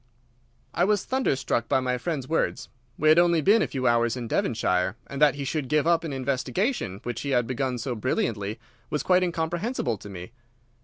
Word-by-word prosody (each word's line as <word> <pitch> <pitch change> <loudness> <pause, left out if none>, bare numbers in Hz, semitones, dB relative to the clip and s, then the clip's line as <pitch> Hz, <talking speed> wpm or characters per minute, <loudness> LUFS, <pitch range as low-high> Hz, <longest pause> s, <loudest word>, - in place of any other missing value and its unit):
I 175 - +1
was 205 +1 +2
thunderstruck 135 - 0
by 135 - +3
my 125 -1 -1
friend's 150 -6 -3
words. 165 - -1 0.3
We 155 - +3
had 155 +2 +7
only 170 -1 +4
been 205 +8 +4
a - - +1
few 130 -2 -4
hours 120 0 +2
in 120 -2 -4
Devonshire, 95 -6 0
and 140 +1 -7
that 145 -3 +5
he 140 - -4
should 145 0 -2
give 150 +1 +2
up 170 0 +3
an 160 - -4
investigation 135 - -1
which 120 -1 -4
he 140 - -4
had 125 -3 +2
begun 130 +1 -2
so 125 +2 -3
brilliantly 110 -3 -2 0.3
was 150 - -1
quite 185 0 +4
incomprehensible 170 - -1
to 105 - -10
me. 90 +1 -8
135 Hz, 195 wpm, -26 LUFS, 120-165 Hz, 0.3 s, had